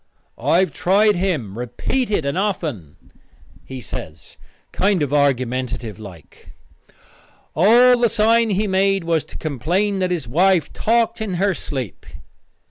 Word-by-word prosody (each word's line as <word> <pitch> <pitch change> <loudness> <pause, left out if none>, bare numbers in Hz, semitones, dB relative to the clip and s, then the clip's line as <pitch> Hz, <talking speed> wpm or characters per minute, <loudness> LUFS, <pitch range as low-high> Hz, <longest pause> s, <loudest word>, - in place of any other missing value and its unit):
"I 175 - +3
have 190 - 0
tried 205 +3 +3
him 150 - -2
repeated 200 - -2
and 140 - -1
often," 160 - -3 0.7
he 130 -1 -8
says, 80 -8 -9 0.4
kind 195 -4 +1
of 145 -1 -3
argumentative 125 -5 -1
like. 95 -7 -14 1.0
"All 240 +8 +5
the 235 -1 +3
sign 230 +1 +2
he 205 +1 0
made 195 -1 +1
was 165 -2 0
to - - -10
complain 175 - -1
that 185 -1 0
his 170 -8 -3
wife 175 +6 +2
talked 230 0 0
in 205 -4 -3
her 195 +2 +1
sleep." 130 - -6
180 Hz, 130 wpm, -20 LUFS, 130-205 Hz, 1.0 s, All